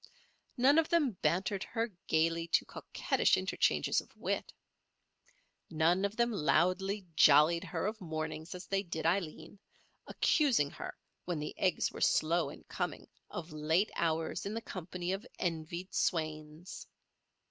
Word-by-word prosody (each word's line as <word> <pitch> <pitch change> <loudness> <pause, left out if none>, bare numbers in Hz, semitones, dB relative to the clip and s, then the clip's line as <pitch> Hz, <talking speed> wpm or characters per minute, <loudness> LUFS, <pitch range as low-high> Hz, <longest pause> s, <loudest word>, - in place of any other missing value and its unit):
None 275 +5 +5
of 320 - +1
them 315 -7 +3
bantered 190 +3 0
her 230 0 -2 0.2
gaily 165 +1 +1
to - - +2
coquettish - - +1
interchanges - - +1
of - - -22
wit. - - -2 1.2
None 170 +4 +2
of 200 +1 -3
them 235 0 +2
loudly 190 +2 +1
"jollied" 155 +4 +6
her 185 - -3
of 215 +1 -3
mornings 160 0 -4
as 180 - -8
they 195 0 0
did 170 -4 -5
Aileen, 170 +1 -1 0.5
accusing 245 - +2
her, - - -7 0.3
when 175 -2 -2
the 150 0 -4
eggs 185 - +1
were - - -9
slow 170 +2 +2
in - - -11
coming, - - -4 0.2
of 165 -1 -7
late 160 +6 +1
hours 165 -1 -1
in 210 - -4
the 230 - -3
company 180 -3 -5
of 195 +2 -3
envied 170 +1 -3
swains. 155 0 -2
175 Hz, 140 wpm, -33 LUFS, 160-200 Hz, 1.2 s, jollied